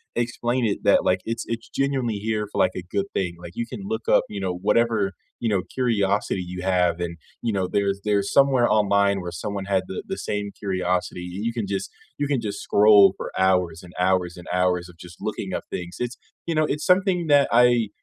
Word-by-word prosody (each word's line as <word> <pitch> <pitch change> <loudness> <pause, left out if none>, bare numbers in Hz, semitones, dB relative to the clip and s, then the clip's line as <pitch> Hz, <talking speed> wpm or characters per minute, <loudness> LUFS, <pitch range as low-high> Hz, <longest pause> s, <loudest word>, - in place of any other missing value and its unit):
explain 120 +1 0
it 105 - -1
that, - - +4
like, 90 0 +2
it's 115 0 -3
it's 115 0 -4
genuinely 135 -5 -1
here 105 -1 -1
for, - - -3
like, 90 - +3
a 90 - -5
good 100 - +1
thing, 90 -3 -1
like, 85 0 -10
you 120 - -2
can 120 -6 -7
look 110 +3 -4
up, - - +5
you 100 - -5
know, 95 -2 -1
whatever, 110 +1 +1 0.3
you 115 - -1
know, 100 -3 +1 0.2
curiosity 105 -6 +1
you 90 - -5
have 90 -2 +2
and, 85 -1 -4 0.2
you 115 - 0
know, 95 -2 0
there's 100 0 0
there's 100 -1 +1
somewhere 135 -3 +4
online 100 -1 +3
where 90 -1 -5
someone 100 -2 -3
had 95 -1 +1
the 95 - -5
the 190 - -4
same 105 0 -3
curiosity, 90 -2 -1
you 95 +3 -6
you 115 - -1
can 105 -4 -1
just 95 -1 -3 0.3
you 145 - 0
can 130 -4 +1
just 100 0 -4
scroll 100 -2 +7
for - - -5 0.2
hours 90 -3 +1
and 90 0 -13
hours 90 -2 +1
and 90 - -11
hours 90 -1 +1
of 90 - -15
just 85 -1 -13
looking - - -4
up - - -8
things, 90 0 -5
it's 125 0 -3 0.3
you 165 - 0
know, 155 0 +3
it's 150 - -5
something 180 -3 +2
that 140 -1 +6
I 120 -2 +4
100 Hz, 220 wpm, -24 LUFS, 90-120 Hz, 0.3 s, scroll